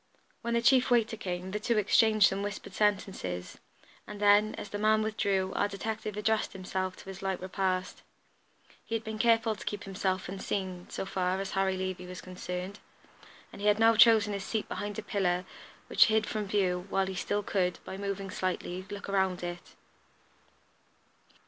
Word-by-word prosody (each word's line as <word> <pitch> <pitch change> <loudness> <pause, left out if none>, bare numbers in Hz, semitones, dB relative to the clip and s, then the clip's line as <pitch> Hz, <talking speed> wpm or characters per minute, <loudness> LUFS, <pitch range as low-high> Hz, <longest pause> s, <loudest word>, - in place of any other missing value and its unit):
When 235 0 -1
the 235 - +1
chief 255 +1 +5
waiter 230 -2 +3
came, 185 -3 -4
the 210 - -2
two 235 +1 +1
exchanged 215 0 +5
some 195 +1 -3
whispered 205 0 -5
sentences, 185 - -1 0.5
and 210 -1 -8
then, 205 +1 +5
as 205 - -7
the 205 - -4
man 215 +1 +3
withdrew, 195 -3 0
our 205 - +2
detective 210 +1 -4
addressed 220 +1 0
himself 185 0 -3
to - - -13
his 195 0 -8
light 190 -1 -1
repast. 185 0 -2 0.8
He 230 - -3
had 225 - -2
been 220 -1 -5
careful 225 -1 +3
to - - -10
keep 205 -1 -4
himself 190 -1 -2
unseen, 190 -1 -4
so - - -4
far 185 -1 -1
as 195 0 -4
Harry 190 -1 +1
Levey 185 -1 -4
was 180 0 -7
concerned; 185 +2 -6 0.7
and - - -9
he 205 - 0
had 210 0 +5
now 225 +1 +5
chosen 220 -2 +6
his 200 -1 -3
seat 220 +1 -2
behind 205 -1 -4
a 220 - -4
pillar, 185 -3 0 0.4
which - - +6
hid 220 -1 +2
him - - -7
from 215 -1 -2
view, 185 -2 0
while 195 0 +1
he 190 - -4
still 205 +3 -1
could, 185 -3 0
by - - -6
moving 195 0 -4
slightly, 185 0 -3
look 205 -1 -7
around 190 -2 0
it. 175 0 -6
195 Hz, 180 wpm, -30 LUFS, 185-215 Hz, 0.8 s, chosen